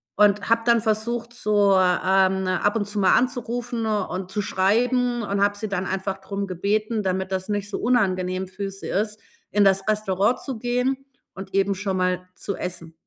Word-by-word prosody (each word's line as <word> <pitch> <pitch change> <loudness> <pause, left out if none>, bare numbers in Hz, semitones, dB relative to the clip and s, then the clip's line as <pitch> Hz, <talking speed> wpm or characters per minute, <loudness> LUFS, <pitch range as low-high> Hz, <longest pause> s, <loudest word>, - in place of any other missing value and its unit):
und 205 0 +3
habe 230 0 +3
dann 235 -2 +4
versucht 230 +2 -1
so, 205 -4 +3
ähm, 190 +1 +3
ab 185 +3 +1
und 215 -2 0
zu 205 - -7
mal 190 - +4
anzurufen 245 -1 -1
und, 190 -4 -2
zu 210 - -1
schreiben 240 +6 +1
und 200 -1 0
habe 205 0 +2
sie 215 - -4
dann 195 -1 -2
einfach 190 0 -2
drum 200 +1 -4
gebeten, 210 +4 -1
damit 190 0 -1
das 185 0 -2
nicht 205 -1 -2
so 205 - -3
unangenehm 185 -6 +1
für 195 +1 -5
sie 195 - -8
ist, 210 +2 -1 0.3
in 205 - +4
das 195 0 +3
Restaurant 210 +2 +1
zu 265 -4 -5
gehen 250 +2 0 0.4
und 190 0 -9
eben 195 0 +2
schon 190 0 -2
mal 185 0 0
zu 200 - -4
essen. 170 -2 -6
200 Hz, 185 wpm, -24 LUFS, 190-220 Hz, 0.4 s, dann